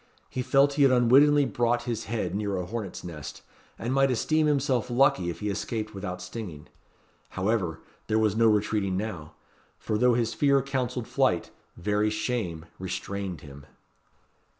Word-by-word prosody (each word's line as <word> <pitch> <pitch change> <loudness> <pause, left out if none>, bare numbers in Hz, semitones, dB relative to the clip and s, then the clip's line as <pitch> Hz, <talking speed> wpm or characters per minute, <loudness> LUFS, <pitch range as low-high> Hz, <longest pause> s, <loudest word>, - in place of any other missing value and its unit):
He 130 - -2
felt 140 +2 +3
he 145 - 0
had 135 -2 +6
unwittingly 140 +4 +5
brought 120 +1 0
his 115 -3 -3
head 105 -6 -2
near 100 -1 -1
a 90 - -3
hornet's 100 -1 -5
nest, 80 -5 -8 0.3
and 120 +3 -2
might 135 0 +4
esteem 155 +5 +1
himself 135 -5 +1
lucky 125 -7 +3
if 85 - -6
he 105 - -1
escaped 110 +1 -4
without 90 -2 -5
stinging. 90 -6 -7 0.6
However, 95 -4 -1 0.3
there 110 - +1
was 110 -2 +2
no 115 0 +4
retreating 105 -3 +1
now; 95 -7 -5 0.4
for 105 - -2
though 125 0 +4
his 115 -1 0
fear 140 -2 +3
counselled 130 -3 -2
flight, - - +1 0.3
very 105 +4 +1
shame 105 -7 -3
restrained 95 -2 -4
him. 70 -1 -12
110 Hz, 155 wpm, -27 LUFS, 95-125 Hz, 0.6 s, had